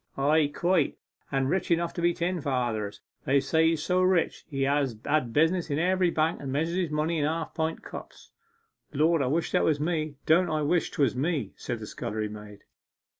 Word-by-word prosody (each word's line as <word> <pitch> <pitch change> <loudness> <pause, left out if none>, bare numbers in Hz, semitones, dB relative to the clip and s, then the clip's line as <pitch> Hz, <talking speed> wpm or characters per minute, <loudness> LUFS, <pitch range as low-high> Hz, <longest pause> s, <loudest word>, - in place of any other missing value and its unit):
'Ay, 150 +2 +3
quite; 170 +1 +1 0.3
and 135 -1 +1
rich 190 +6 -1
enough 170 0 +1
to 170 - -4
be 175 0 +3
ten 175 0 -2
fathers. 120 -7 -2 0.2
They 140 +1 +4
say 160 +4 +2
he's 165 -2 0
so 180 0 +2
rich 185 -2 +1
that - - -41
he 135 -3 -1
has 140 -3 +1
business 155 +8 +1
in 145 - 0
every 180 +2 +2
bank, 160 0 0
and 135 -2 -4
measures 160 +5 -1
his 180 -3 0
money 155 +2 0
in 145 - +1
half 160 +1 -2
pint 160 0 -2
cups.' - - -10 0.6
'Lord, 155 +2 +3
I 130 - +1
wish 160 +5 -1
it - - +4
was 150 -2 +2
me, 155 -1 -1
don't 170 +2 +4
I 155 -1 0
wish 165 +3 +1
'twas 135 -4 +1
me!' 135 - -1
said - - -4
the - - -7
scullery 105 0 -4
maid. 105 -1 -11
155 Hz, 200 wpm, -27 LUFS, 135-170 Hz, 0.6 s, They